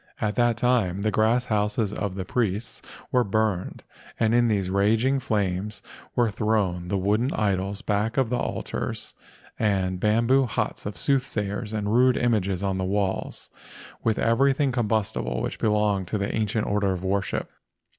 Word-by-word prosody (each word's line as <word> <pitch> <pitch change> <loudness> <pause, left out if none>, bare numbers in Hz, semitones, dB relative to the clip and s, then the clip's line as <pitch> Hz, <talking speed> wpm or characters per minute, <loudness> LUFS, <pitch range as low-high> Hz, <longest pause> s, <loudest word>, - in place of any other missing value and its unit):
At 105 -1 0
that 120 -2 +2
time 110 -6 +1
the 110 - +1
grass 115 +4 +2
houses 105 -2 0
of 100 -3 -3
the 95 -1 -4
priests 110 +1 -2 0.3
were 125 -1 +3
burned 105 -3 -1 0.4
and 115 0 +2
in 120 0 +4
these 100 -4 +1
raging 110 +7 +2
flames 105 -3 -2 0.3
were 120 -3 +2
thrown 100 -5 0
the 100 - 0
wooden 105 +7 +1
idols 100 -1 -1
back 105 +3 0
of 130 -3 +2
the 125 - +1
altars - - -3 0.5
and 95 -4 0
the - - +2
bam¬ 110 +2 +3
boo 135 +2 +4
huts 105 - -3
of 105 - -4
the - - -9
soothsayers 105 -6 0
and 105 -2 -2
the 105 - -1
rude 125 +2 +4
images 100 -6 0
on 95 -1 -1
the - - -1
walls, 95 0 -2 0.5
with 110 -1 +1
everything 135 +4 +2
combustible 105 - -1
which - - -4
belonged 105 -3 +1
to 105 - -1
the 100 0 -2
ancient 110 0 0
order 100 -2 +1
of 90 0 -5
worship. 100 +1 -1
105 Hz, 170 wpm, -25 LUFS, 100-115 Hz, 0.5 s, in